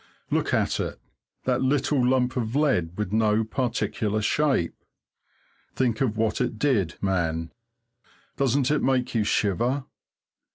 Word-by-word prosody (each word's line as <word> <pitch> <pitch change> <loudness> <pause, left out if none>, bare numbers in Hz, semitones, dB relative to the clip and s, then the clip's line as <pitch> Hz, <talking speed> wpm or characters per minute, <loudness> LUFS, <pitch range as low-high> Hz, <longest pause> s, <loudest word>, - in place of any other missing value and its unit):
Look - - +1
at - - +1
it! - - -3 0.5
That 130 0 +1
little 135 0 +2
lump 125 0 +2
of 120 -1 -2
lead 90 - +1
with 105 -3 -2
no 110 0 +3
particular 110 -3 -1
shape. 135 - +1 1.0
Think 120 -3 0
of 110 -5 0
what 110 0 0
it 120 -3 -1
did, 105 - +1
man! 85 -4 -1 0.8
Doesn't 135 0 +1
it 150 - +2
make 130 -1 +1
you 115 -3 +2
shiver? 120 +7 0
120 Hz, 130 wpm, -25 LUFS, 105-130 Hz, 1.0 s, no